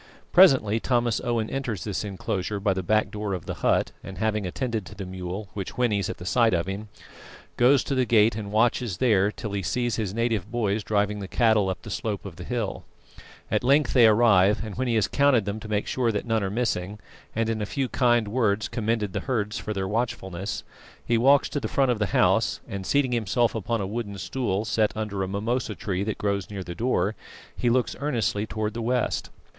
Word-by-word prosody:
Presently 130 - +6
Thomas 120 -1 +1
Owen 120 -3 0
enters 125 -8 -3
this 105 -1 -3
enclosure 100 0 -3
by 100 -1 +1
the 95 - -2
back 110 +4 +1
door 105 -2 -3
of 90 - -7
the - - -3
hut, - - +2
and 95 - -8
having 105 -3 0
attended 115 +2 -2
to 105 - -11
the 100 0 -6
mule, 95 +2 -6
which 100 -3 -5
whinnies 105 -6 +1
at - - -5
the 90 - -9
sight 115 +1 +3
of 85 0 0
him, 100 +3 -5 0.7
goes 130 +3 +4
to - - -3
the 130 -1 +2
gate 110 -1 +4
and 105 -2 -5
watches 110 -2 +1
there 105 -4 +3
till 105 -1 -6
he 100 -1 -2
sees 120 +5 -1
his 105 -5 -2
native 110 -3 -1
boys 110 -3 -1
driving 105 0 0
the 100 - -5
cattle 110 -3 +3
up 95 - -4
the 105 - -8
slope 105 0 -3
of 90 -4 -8
the - - -7
hill. 120 -5 -3 0.7
At - - +1
length 140 +1 +3
they 120 -4 +7
arrive, 105 -2 +4
and 105 - -6
when 130 +4 -2
he 120 - +1
has 110 -3 +2
counted 140 -7 +3
them 100 +1 -3
to 110 - -9
make 105 -1 -1
sure 120 -3 0
that 105 - -3
none 115 -2 +1
are 95 - -1
missing, 105 -3 -2 0.4
and 115 0 +1
in 110 -1 -1
a 105 - -2
few 135 +2 -1
kind 120 -3 +2
words 105 -2 +1
commended 110 -3 -1
the - - -1
herds 105 -4 -1
for 110 - -5
their 95 -2 -2
watchfulness, 100 -4 -3 0.4
he 120 - +2
walks 135 +5 +5
to 145 - -2
the - - -3
front 135 -2 +2
of 115 - -1
the 105 - +1
house - - +2
and, 100 -2 -5
seating 140 -3 +2
himself 120 0 +1
upon 115 +1 -2
a - - -2
wooden 105 0 -4
stool 110 -3 -2
set 110 -1 +1
under 105 -2 -3
a 95 - -1
mimosa 110 +3 -2
tree 95 -1 -2
that 110 0 -3
grows 100 -2 -1
near 100 -2 -5
the 85 - -6
door, 110 0 0 0.4
he 120 - 0
looks 125 +1 +1
earnestly 115 -7 0
towards 110 0 -3
the 115 - -4
west. 125 +1 -1
110 Hz, 220 wpm, -25 LUFS, 100-120 Hz, 0.7 s, they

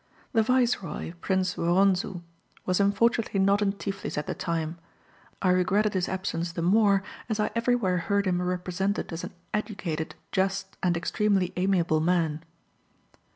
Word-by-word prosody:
The 225 - +5
viceroy, 235 -9 0
Prince 185 -1 0
Woronzou, 180 +1 +2 0.4
was 185 +1 +1
unfortunately 210 +1 +2
not 200 +2 +3
in 200 -1 +2
Tiflis 200 -3 -5
at 150 - -1
the - - -2
time. 165 -1 -3 0.6
I 185 - +4
regretted 195 +4 +2
his 185 -2 0
absence 180 -3 -2
the 170 - -3
more, 200 +1 +4 0.3
as 220 -1 -1
I 210 - +1
everywhere 230 -6 +1
heard 200 +4 0
him 180 -1 +1
represented 180 +2 -2
as 165 - -5
an - - -7 0.2
educated, 195 -7 -3 0.2
just, 190 0 -1
and 175 -2 +2
extremely 195 +1 +1
amiable 180 -4 +2
man. 160 -2 +1
190 Hz, 145 wpm, -27 LUFS, 175-200 Hz, 0.6 s, The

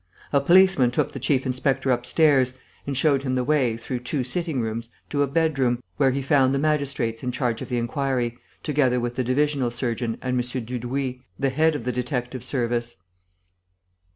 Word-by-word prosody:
A 140 - +4
policeman 175 -4 +5
took 125 - 0
the - - -6
chief 135 -2 +1
inspector 130 +1 0
upstairs 130 +1 +3 0.3
and 140 -2 -2
showed 140 -1 +3
him 130 -2 -1
the 125 - +1
way, 130 -5 +1
through 125 +2 -4
two 125 +2 -2
sitting 160 +2 -1
rooms, 115 0 -3 0.2
to 145 - +1
a 145 - +3
bedroom, 135 -5 +1
where 135 -2 +4
he 135 +1 -1
found 135 -1 +3
the - - +1
magistrates 140 -6 0
in 125 - -2
charge 120 -3 -1
of - - -6
the 125 - -1
inquiry, 120 -1 -1 0.3
together 130 -4 +2
with 120 0 -2
the 130 - 0
divisional 135 0 +1
surgeon 120 -1 -2
and 125 -1 -1
M. 125 -1 -4
Dudouis, 125 +2 -3 0.2
the 135 - +1
head 155 +3 +2
of 140 - -4
the 125 - -1
detective 125 0 -3
service. 120 -3 -1
130 Hz, 180 wpm, -24 LUFS, 120-140 Hz, 0.3 s, policeman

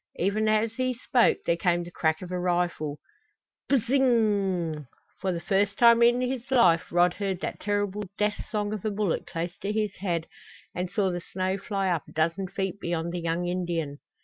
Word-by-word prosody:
Even 210 +4 +1
as 215 +1 +2
he 255 +1 -1
spoke 245 0 +3
there 170 - +2
came 175 0 +1
the 175 - -10
crack 160 0 0
of 180 - -8
a 180 - -1
rifle. 175 -4 -1 0.7
Bzzzzzzz 265 -5 +3
inggggg! 195 - +1 0.3
For 190 - -1
the 170 - -2
first 200 +3 +1
time 235 -1 +6
in 240 +1 +5
his 255 0 -3
life 180 -10 +4
Rod 175 0 +4
heard 195 -2 -2
that - - -4
terrible 205 0 -1 0.2
death 210 0 0
song 210 -1 -1
of 210 - -5
a 215 - 0
bullet 205 -4 -1
close 170 +1 -4
to 200 - -2
his 210 -2 -1
head 175 -4 -1 0.5
and 180 0 -3
saw 195 -2 +1
the 175 0 -3
snow 185 +2 -2
fly 195 -1 -2
up 165 -3 -2
a - - -14
dozen 165 +4 0
feet 190 +1 -3
beyond 170 -1 -2
the 175 - -3
young 170 +1 -1
Indian. 170 -5 -2
190 Hz, 195 wpm, -27 LUFS, 175-210 Hz, 0.7 s, time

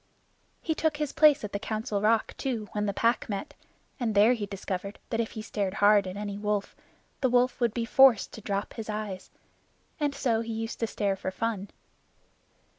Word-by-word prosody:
He 320 - 0
took 310 -1 0
his 300 -2 -2
place 300 -3 +5
at 210 - -5
the 200 - -1
Council 215 -1 -2
Rock, 220 +1 +2
too, 235 -6 -3
when 210 0 -1
the - - +1
Pack 230 +4 +1
met, 200 -2 -4 0.5
and 225 -4 -1
there 210 +4 +6
he 215 -4 -3
discovered 195 0 -5
that 225 - 0
if 230 - -2
he 215 - -6
stared 200 -3 -2
hard 205 -1 +5
at 185 +1 -6
any 205 -1 -4
wolf, 210 -1 -2 0.4
the 260 - +2
wolf 250 +1 +2
would 235 -2 +3
be 235 -1 -1
forced 265 -2 +5
to 220 - -9
drop 200 0 -3
his 220 -2 -7
eyes, 210 -3 -4 0.7
and 290 -2 0
so 230 -4 +1
he 230 0 -4
used 225 +1 -4
to 230 - 0
stare 200 -2 -1
for 190 - -4
fun. 205 0 -3
215 Hz, 195 wpm, -28 LUFS, 205-235 Hz, 0.7 s, there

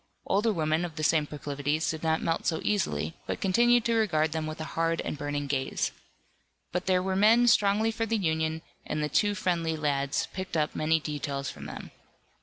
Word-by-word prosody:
Older 210 +4 +2
women 160 -2 0
of 170 -3 -5
the 155 - -4
same 155 -1 +3
proclivities 145 +1 -2
did 160 -1 -6
not 160 -1 0
melt 165 - -1
so 160 - +1
easily, 80 - 0
but - - -3
continued 240 +5 +3
to 235 - +2
regard 160 -9 +2
them 160 0 -2
with 155 0 -6
a - - -3
hard 165 0 0
and - - -4
burning 145 0 -3
gaze. 135 -1 -1 0.8
But 180 +1 -3
there 185 -1 +3
were 190 0 -1
men 220 +5 +5
strongly 210 0 +4
for 225 0 -2
the 225 +1 +1
Union, 160 -3 -1 0.2
and 150 - -2
the 150 - -1
two 205 +7 +2
friendly 170 -4 0
lads 145 +1 0
picked 185 -3 -4
up 150 -1 0
many 160 +1 +2
details 145 -2 -3
from 70 -1 -10
them. 70 - -8
160 Hz, 200 wpm, -28 LUFS, 150-190 Hz, 0.8 s, men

